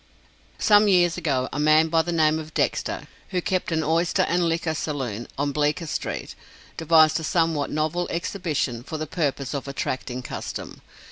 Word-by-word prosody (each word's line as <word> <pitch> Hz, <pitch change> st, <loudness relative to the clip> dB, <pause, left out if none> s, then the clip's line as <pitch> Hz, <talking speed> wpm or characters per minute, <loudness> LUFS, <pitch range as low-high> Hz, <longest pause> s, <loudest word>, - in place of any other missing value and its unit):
Some 210 Hz, 0 st, +5 dB
years 180 Hz, -3 st, +4 dB
ago, 140 Hz, -7 st, 0 dB
a 145 Hz, -, -2 dB
man 155 Hz, +2 st, +4 dB
by 165 Hz, 0 st, +3 dB
the 175 Hz, +2 st, -3 dB
name 160 Hz, -1 st, +3 dB
of 155 Hz, 0 st, -9 dB
Dexter, -, -, -1 dB, 0.3 s
who 185 Hz, -, 0 dB
kept 185 Hz, 0 st, -1 dB
an 160 Hz, -1 st, +1 dB
oyster 165 Hz, +3 st, +2 dB
and 175 Hz, 0 st, +1 dB
liquor 165 Hz, -1 st, -1 dB
saloon 130 Hz, -8 st, -3 dB
on 145 Hz, +1 st, 0 dB
Bleecker 150 Hz, +3 st, 0 dB
street, 150 Hz, -, -4 dB, 0.4 s
devised 160 Hz, -1 st, +4 dB
a -, -, -6 dB
somewhat 165 Hz, -3 st, +1 dB
novel 155 Hz, +3 st, -1 dB
exhibition 160 Hz, -, -2 dB
for 155 Hz, +6 st, -6 dB
the 155 Hz, -, -3 dB
purpose 145 Hz, -5 st, -2 dB
of 140 Hz, -1 st, -4 dB
attracting 130 Hz, -2 st, -4 dB
custom. -, -, -6 dB
155 Hz, 165 wpm, -24 LUFS, 145-170 Hz, 0.4 s, Some